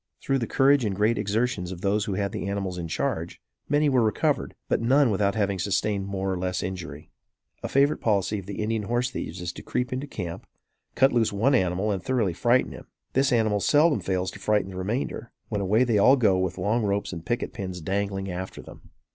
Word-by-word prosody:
Through 135 Hz, -1 st, 0 dB
the 115 Hz, -, -2 dB
courage 140 Hz, 0 st, +4 dB
and 100 Hz, -3 st, -1 dB
great 105 Hz, +3 st, +2 dB
exertions 105 Hz, -3 st, -1 dB
of 90 Hz, -2 st, -7 dB
those 100 Hz, +1 st, +1 dB
who 100 Hz, -4 st, -2 dB
had 100 Hz, 0 st, -1 dB
the -, -, -4 dB
animals 95 Hz, -2 st, -3 dB
in 85 Hz, -, -4 dB
charge, 85 Hz, -2 st, -2 dB, 0.3 s
many 145 Hz, +1 st, +3 dB
were 130 Hz, -3 st, +3 dB
recovered, 110 Hz, -2 st, 0 dB
but -, -, +1 dB
none 130 Hz, +1 st, +4 dB
without 100 Hz, 0 st, +1 dB
having 100 Hz, -3 st, 0 dB
sustained 100 Hz, +1 st, 0 dB
more 95 Hz, -1 st, -2 dB
or 90 Hz, -, -3 dB
less 90 Hz, 0 st, -2 dB
injury. 85 Hz, -5 st, -6 dB, 0.5 s
A -, -, -4 dB
favorite 140 Hz, +2 st, +2 dB
policy 105 Hz, -1 st, +1 dB
of 95 Hz, -, -11 dB
the 100 Hz, +1 st, -4 dB
Indian 110 Hz, 0 st, -1 dB
horse 120 Hz, +2 st, 0 dB
thieves 90 Hz, -6 st, -5 dB
is 90 Hz, 0 st, -4 dB
to -, -, -9 dB
creep 125 Hz, 0 st, -2 dB
into 130 Hz, +3 st, -3 dB
camp, 90 Hz, -10 st, -6 dB, 0.5 s
cut 135 Hz, +1 st, +4 dB
loose 115 Hz, -2 st, +2 dB
one 110 Hz, +8 st, +2 dB
animal 95 Hz, -2 st, +1 dB
and 95 Hz, -2 st, -2 dB
thoroughly 115 Hz, -9 st, 0 dB
frighten 120 Hz, +7 st, +2 dB
him. -, -, -11 dB, 0.3 s
This 135 Hz, +2 st, +2 dB
animal 110 Hz, -4 st, +2 dB
seldom 150 Hz, +7 st, +4 dB
fails 95 Hz, -1 st, -1 dB
to -, -, -11 dB
frighten 105 Hz, -3 st, +1 dB
the -, -, -9 dB
remainder, 115 Hz, +4 st, -3 dB, 0.2 s
when 105 Hz, -3 st, -2 dB
away 105 Hz, +5 st, +3 dB
they 115 Hz, -4 st, +2 dB
all 130 Hz, +7 st, +7 dB
go 110 Hz, -8 st, +3 dB
with 95 Hz, -1 st, -2 dB
long 110 Hz, +4 st, +1 dB
ropes 100 Hz, -2 st, -1 dB
and 85 Hz, -1 st, -7 dB
picket 120 Hz, +6 st, -2 dB
pins 95 Hz, -2 st, -5 dB
dangling 95 Hz, +2 st, -2 dB
after 95 Hz, +1 st, -6 dB
them. -, -, -14 dB
105 Hz, 215 wpm, -26 LUFS, 95-120 Hz, 0.5 s, all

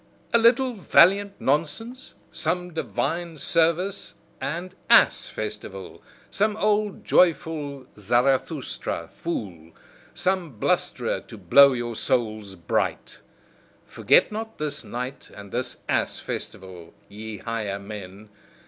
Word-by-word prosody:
A 235 Hz, -, +6 dB
little 250 Hz, +3 st, +4 dB
valiant 200 Hz, 0 st, +4 dB
nonsense, 195 Hz, -, -2 dB, 0.2 s
some 180 Hz, -1 st, -2 dB
divine 160 Hz, -, -2 dB
service 170 Hz, +6 st, 0 dB, 0.3 s
and 175 Hz, +5 st, -4 dB, 0.2 s
ass -, -, +5 dB
festival, 105 Hz, -3 st, -7 dB, 0.3 s
some 210 Hz, +1 st, +1 dB
old 210 Hz, -1 st, 0 dB
joyful 155 Hz, -6 st, +1 dB
Zarathustra 125 Hz, -, 0 dB
fool, 90 Hz, -, -5 dB, 0.4 s
some 180 Hz, -, -1 dB
blusterer -, -, 0 dB
to -, -, -10 dB
blow 140 Hz, -1 st, +6 dB
your 120 Hz, -2 st, -3 dB
souls 110 Hz, -5 st, -1 dB
bright. 85 Hz, -2 st, -2 dB, 0.7 s
Forget -, -, +3 dB
not 220 Hz, +1 st, -6 dB
this 150 Hz, -1 st, -3 dB
night 125 Hz, +3 st, -6 dB
and 100 Hz, -1 st, -11 dB
this 125 Hz, 0 st, -3 dB
ass -, -, 0 dB
festival, 90 Hz, -3 st, -7 dB
ye 110 Hz, +1 st, -8 dB
higher 110 Hz, -2 st, -3 dB
men! 100 Hz, 0 st, -9 dB
140 Hz, 105 wpm, -25 LUFS, -, 0.7 s, A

